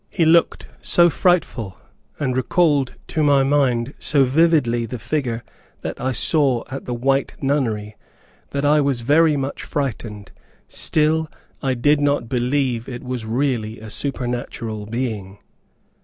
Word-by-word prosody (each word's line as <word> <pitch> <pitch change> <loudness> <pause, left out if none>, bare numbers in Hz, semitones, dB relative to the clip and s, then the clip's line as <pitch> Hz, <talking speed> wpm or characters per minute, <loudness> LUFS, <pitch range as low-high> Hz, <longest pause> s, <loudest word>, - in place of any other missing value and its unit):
He 165 - +1
looked 165 +1 +3
so 175 -1 +4
frightful, 130 - 0 0.4
and 130 -4 -1
recalled 140 0 +1
to 155 - -1
my 140 -2 +4
mind 135 -2 +1
so 140 -3 +3
vividly 130 -5 +2
the 125 - -5
figure 120 -1 -2 0.4
that - - -5
I 130 - 0
saw 130 -1 +2
at 135 - -6
the 125 - -3
White 135 +3 0
Nunnery, 115 -7 -1 0.5
that 140 +1 -2
I 150 +1 +4
was 140 -4 0
very 150 +4 +3
much 135 0 -4
frightened; 115 -8 -4 0.4
still 155 0 +1 0.3
I 130 -2 0
did 145 +4 +2
not 145 -4 +1
believe 125 -1 -1
it 120 -1 -7
was 125 -3 -4
really 115 -3 -1
a 110 0 -9
supernatural 120 -5 -2
being. 110 -5 -4
130 Hz, 140 wpm, -21 LUFS, 120-145 Hz, 0.5 s, so